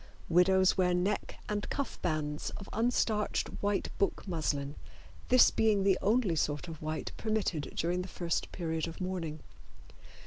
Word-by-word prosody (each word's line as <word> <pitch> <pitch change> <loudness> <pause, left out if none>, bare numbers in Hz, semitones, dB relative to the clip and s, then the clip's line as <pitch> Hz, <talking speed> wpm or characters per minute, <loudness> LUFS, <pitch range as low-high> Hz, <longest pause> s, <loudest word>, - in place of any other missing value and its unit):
Widows 185 +2 +5
wear 180 -1 +3
neck 195 +4 -1
and 205 0 -2
cuff 280 -1 -3
bands 150 -3 -1
of 195 - -9
unstarched 225 -2 +1
white 205 0 -1
book 200 - 0
muslin, 145 -5 -1 0.6
this 255 0 +7
being 215 -3 +3
the 195 -1 +3
only 210 -4 +2
sort 150 +1 -1
of 160 -2 -8
white 155 0 -3
permitted 215 -9 -1
during 175 +2 0
the 180 - -6
first 170 -2 -2
period 165 -2 -2
of 165 - -8
mourning. 175 -5 -3
180 Hz, 145 wpm, -31 LUFS, 160-205 Hz, 0.6 s, this